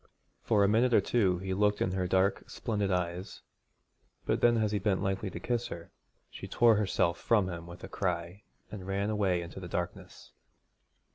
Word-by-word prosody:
For 105 -3 +3
a - - +5
minute 115 +3 +3
or - - +7
two 95 -7 +1
he 95 +1 -3
looked 105 +1 +2
in 95 - 0
her 95 -1 -1
dark 95 +2 +1
splendid 105 -3 -2
eyes; 90 0 -3 0.8
but - - 0
then 120 -1 +5
as 110 -2 +1
he 105 - 0
bent 100 -2 0
lightly 95 0 -1
to - - -7
kiss 120 -1 -1
her, 85 0 -9 0.4
she - - -8
tore 115 -2 +4
herself 95 -4 +1
from 105 -5 +2
him 85 -2 -6
with 85 0 -11
a - - -5
cry 90 +1 -3 0.3
and 95 -3 -7
ran 100 +2 -1
away 95 -5 +1
into 85 +2 -9
the 90 - -7
darkness. 85 0 -6
95 Hz, 190 wpm, -30 LUFS, 90-105 Hz, 0.8 s, or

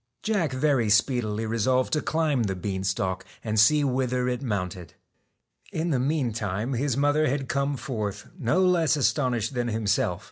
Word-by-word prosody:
Jack 195 -9 0
very 130 -4 +1
speedily 110 -1 +1
resolved 115 +4 +1
to 150 - +2
climb 155 -5 0
the 100 -4 -1
bean 95 +1 -3
stalk 95 -1 -1 0.2
and 110 -1 0
see 150 +7 +5
whither 125 -2 0
it 125 -1 -2
mounted. 90 - -4 0.8
In 165 +2 -1
the 135 - +1
meantime 120 -5 -1
his 130 +1 -1
mother 145 +2 +2
had 135 0 -1
come 140 +1 -1
forth, 105 -6 -4
no 170 +8 +2
less 170 -4 +3
astonished 125 -4 0
than 120 -1 -1
himself. 110 -3 0
125 Hz, 155 wpm, -26 LUFS, 105-145 Hz, 0.8 s, see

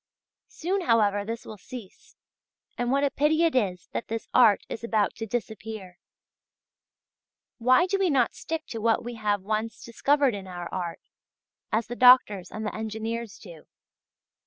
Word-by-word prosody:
Soon, 375 +4 -2
however, 210 - +2
this 230 +3 -6
will 215 -2 -9
cease, 235 -3 -11 0.6
and 245 -1 -2
what 280 +1 +2
a 280 - +2
pity 310 +3 +2
it 330 - +3
is 185 -8 0
that - - -4
this 225 0 -4
art 225 -5 +5
is 230 - -7
about 220 -3 +1
to 225 - -5
disappear! 220 -4 -5 1.6
Why 255 +9 +5
do 390 +1 -1
we 380 -2 +2
not 260 -6 +2
stick 325 0 -5
to 225 - -5
what 225 0 +2
we 240 +1 -5
have 205 -3 -1
once 215 +2 -3
discovered 275 +3 +2
in 195 -2 -6
our 175 -1 -6
art, 175 -2 -4 0.7
as 220 +1 +1
the 240 - -6
doctors 245 -7 +6
and 215 0 -6
the 210 - -3
engineers 220 0 -4
do? 170 -6 -13
225 Hz, 160 wpm, -26 LUFS, 205-255 Hz, 1.6 s, doctors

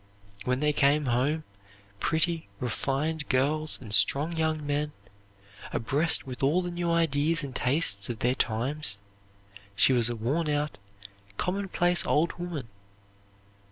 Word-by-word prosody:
When 125 +2 0
they 150 0 +2
came 145 +1 +3
home, 135 +6 0 0.6
pretty, 160 -2 0
refined 140 +6 -2
girls 150 +4 +2
and 110 -5 -8
strong 140 +11 +3
young 160 -2 -1
men, 145 +1 -2 0.8
abreast 145 +8 +2
with 130 -2 -8
all 155 +7 +2
the 175 - -4
new 175 0 -2
ideas 165 0 +2
and 135 -2 -7
tastes 125 -7 +1
of 120 - -3
their 125 +3 +1
times, 120 -1 0 0.8
she 100 +7 +4
was 120 -2 +5
a 120 - -3
worn 140 +9 -1
out, 150 -4 -2 0.6
commonplace 180 -2 +1
old 160 +3 +1
woman. 170 -8 -5
150 Hz, 130 wpm, -27 LUFS, 125-160 Hz, 0.8 s, was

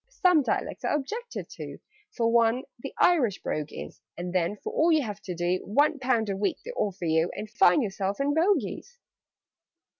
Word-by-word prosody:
"Some 365 -10 +4
dialects 265 - -2
are - - +1
objected 445 - -4
to - - -7 0.4
For 230 -1 +2
one, 235 +2 +3 0.2
the 275 - -6
Irish 265 - +3
brogue 150 -1 -3
is: - - -9 0.2
And 175 +1 -5
then, 185 +2 +1
for - - -4
all 330 +2 +3
you 310 -3 +3
have 210 -3 -6
to 185 -3 -5
do, 175 +2 0
One 290 +7 +2
pound 250 -4 +1
a 200 - -1
week 200 +1 -1
they 485 - -5
offer 195 - -2
you, 160 +1 +2
And 215 - -5
find 235 +5 +4
yourself 195 0 -2
in 280 +1 +1
Bogies!" 400 +8 0
230 Hz, 185 wpm, -27 LUFS, 195-300 Hz, 0.4 s, Some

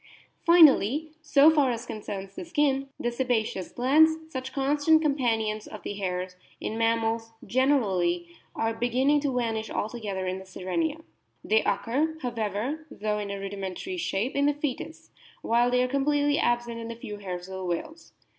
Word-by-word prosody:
Finally 310 - +6
(so 295 0 +6
far 290 -4 +3
as 235 0 -3
concerns 200 -3 -6
the - - -6
skin), 285 -5 0
the 240 - -1
sebaceous 235 -6 -1
glands, 310 +6 +4 0.2
such 260 0 -4
constant 290 +3 +3
companions 230 -8 0
of 215 - -10
the - - -4
hairs 185 -2 -3 0.2
in 220 - -4
mammals 225 0 0
generally, 195 -10 +1 0.3
are 225 0 0
beginning 255 +5 +2
to 285 -1 -1
vanish 225 -3 -1
alto 230 +3 -3
gether 195 -4 -3
in 185 +1 -2
the - - -10
Sirenia. 300 - -2 0.4
They 220 +1 +3
occur, 270 +11 0
however, 240 +6 -3
though 210 -2 -2
in 205 -1 -4
a 200 0 -4
rudimentary 195 - -5
shape, 240 - -1
in 280 0 +3
the 290 - +2
fcetus, 295 +2 -5 0.3
while 240 +1 +3
they 250 0 +3
are - - +1
completely 290 +2 +1
absent 240 -1 0
in 230 - -6
the 230 - -6
few 210 -2 -7
hairs 180 -3 -6
of 190 - -9
the 190 - -5
whales. 310 - -5
240 Hz, 165 wpm, -27 LUFS, 205-285 Hz, 0.4 s, Finally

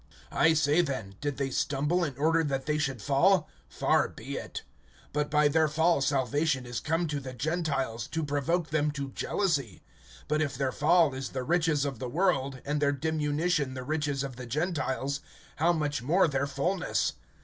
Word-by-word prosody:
(11)I 160 -1 +4
say 150 +2 +4
then, 130 - -4
did 145 -2 -2
they 135 -1 -1
stumble 150 +7 0
in 140 -6 -3
order 160 +3 +3
that 135 -3 -2
they 150 0 0
should 135 -7 -2
fall? 155 - +3 0.2
Far - - +2
be - - -7
it! - - -6 0.5
But 150 0 0
by 150 0 +4
their 160 +2 +3
fall 160 0 +2
salvation 135 0 +1
is 120 0 -4
come 165 +2 0
to 150 -3 -2
the 130 -2 -7
Gentiles, 135 -6 -1
to 160 -1 -2
provoke 155 +4 0
them 150 -1 +2
to 140 -2 -4
jealousy. 145 - -1 0.4
(12)But 150 +1 +1
if 145 -5 -1
their 135 -1 0
fall 160 +1 +4
is 130 0 -4
the 130 -1 -4
riches 160 -1 +2
of 135 -5 -4
the 125 - -4
world, 140 -5 0
and 145 +1 -1
their 140 -1 +3
diminution 150 0 0
the 130 - -5
riches 145 -1 -1
of 135 -3 -6
the 125 -1 -7
Gentiles, 140 -1 -1 0.4
how 165 +3 +3
much 150 -6 -1
more 165 +10 +3
their 140 -1 0
fullness? 160 +7 0
145 Hz, 180 wpm, -29 LUFS, 135-160 Hz, 0.5 s, 11)I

